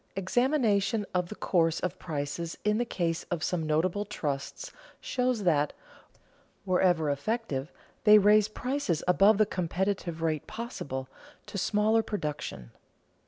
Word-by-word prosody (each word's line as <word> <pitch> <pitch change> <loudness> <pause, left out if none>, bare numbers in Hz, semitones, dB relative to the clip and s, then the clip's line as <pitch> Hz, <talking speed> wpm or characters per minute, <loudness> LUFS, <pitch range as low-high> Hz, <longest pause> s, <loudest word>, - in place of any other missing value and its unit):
_Examination 220 -1 +1
of 180 -1 0
the 215 - -6
course 165 -5 +1
of 180 - -3
prices 155 +1 -4
in 210 +1 +2
the 240 - +1
case 170 -7 -1
of 170 -3 -2
some 165 -2 -1
notable 170 +6 +1
trusts 150 -9 -4 0.3
shows 250 -4 -1
that, 150 -5 +2 0.9
wherever 180 -5 +2
effective, 145 - -2 0.3
they 215 -1 +8
raise 210 +1 +5
prices 245 - -2
above 195 +4 +5
the 215 - +5
competitive 180 -2 -2
rate 155 -2 -1
possible 215 - -5 0.4
to - - -11
smaller 215 +3 +2
production. 150 - -5
185 Hz, 125 wpm, -29 LUFS, 160-215 Hz, 0.9 s, they